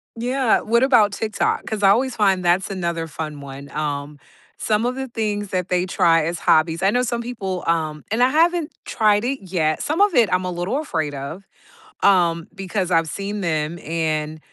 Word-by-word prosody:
Yeah. 245 +1 +1
What 235 +3 +2
about 230 -6 +5
TikTok? 215 +1 -1
'Cause 215 -2 -4
I 195 - +7
always 245 +4 +2
find 190 -4 +2
that's 180 +3 +2
another 170 -3 -3
fun 155 -1 -6
one, 140 0 -9
um, 145 -1 -4 0.4
some 215 +2 0
of 250 +1 -1
the 265 0 -4
things 205 -3 -2
that 180 -1 -2
they 180 0 +1
try 165 -3 +3
as 170 +1 -3
hobbies 160 +2 +2
I 195 - +5
know 245 +1 +2
some 235 -1 -2
people, 195 -7 -4
um 155 -2 -1
and 230 +3 +1
I 255 - +5
haven't 330 +1 +2
tried 210 -1 +2
it 270 +1 -1
yet 170 -5 -1
some 310 +5 -1
of 410 -3 +4
it, 235 -4 +4
I'm 185 0 +1
a 180 - -2
little 175 +10 -2
afraid 160 - -2
of, 140 +8 -7 0.6
um, 170 -4 +3
because 190 -1 -3
I've 165 -1 +3
seen 200 +1 -4
them, 160 0 -2
and 155 -1 -2
185 Hz, 195 wpm, -21 LUFS, 165-225 Hz, 0.6 s, I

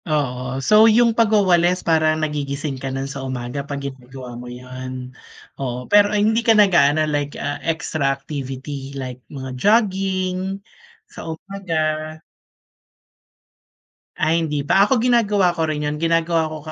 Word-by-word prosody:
Oo. 130 -4 -1
So, 215 +1 +7
yung 230 +1 +4
pagwawalis 185 -6 +3
parang 155 -1 +2
nagigising 140 -2 -4
ka 135 - -3
nun 135 +1 -3
sa 135 0 -6
umaga 130 0 -4
pag 140 0 -6
ginagawa 130 -2 -8
mo 125 +1 -8
yun? 130 +1 -8 0.5
Oo, 125 -1 -4
pero 205 +4 +5
ay 205 0 +1
hindi 225 +2 +2
ka 225 -2 +4
nag-aano 155 -7 +4
like, 145 -1 -2
ah, 145 0 -4
extra 155 -3 -1
activity 135 0 -5
like 130 -2 -6
mga 130 -3 -7
jogging, 190 -3 +1 0.5
sa - - -9
umaga? 160 -3 -3 2.0
Ay, 165 +2 +2
hindi 150 -2 -2
pa. 195 - +5
Ako 245 +4 +2
ginagawa 210 -7 +2
ko 165 - -1
rin 150 -1 -2
yun, 150 - -2
ginagawa 165 0 +1
ko 155 - -5
ka - - -5
155 Hz, 145 wpm, -21 LUFS, 135-190 Hz, 2.0 s, So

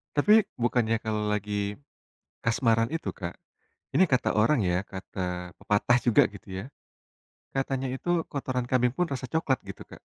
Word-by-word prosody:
Tapi 210 +8 +6
bukannya 120 -2 +1
kalau 105 -1 -1
lagi 105 -1 -1 0.7
kasmaran 115 0 +2
itu 165 - -2
Kak, 85 -2 -6 0.6
Ini 185 -2 +4
kata 130 - +2
orang 110 0 +3
ya, 90 +1 +1
kata 90 -2 -5
pepatah 105 +4 +2
juga 120 -3 +5
gitu 100 -1 -9
ya, 95 +3 -5 0.9
katanya 135 -1 -1
itu 170 +6 0
"kotoran 125 -3 -3
kambing 125 -1 +2
pun 180 0 0
rasa 130 -1 -3
coklat" 150 -5 0
gitu, 100 - -8
Kak? - - -13
115 Hz, 150 wpm, -28 LUFS, 105-135 Hz, 0.9 s, Tapi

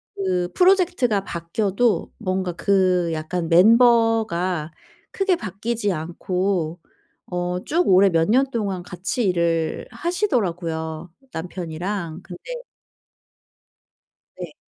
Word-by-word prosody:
그 180 -2 -1
프로젝트가 355 - +3
바뀌어도 200 +7 -1
뭔가 185 -3 -1
그 185 -2 +2
약간 165 +2 -3
멤버가 215 -5 +4 0.4
크게 390 -2 +1
바뀌지 210 +1 -2
않고 175 +1 -2 0.5
어 180 0 -2
쭉 345 +4 +1
오래 190 +1 +6
몇 165 +1 +1
년 265 +4 +3
동안 200 -6 -2
같이 185 +7 -3
일을 170 -3 0
하시더라고요, 175 - -2 0.2
남편이랑. 175 +1 -5
근데 175 -2 -11 2.0
네. - - -7
185 Hz, 205 characters per minute, -22 LUFS, 170-225 Hz, 2.0 s, 오래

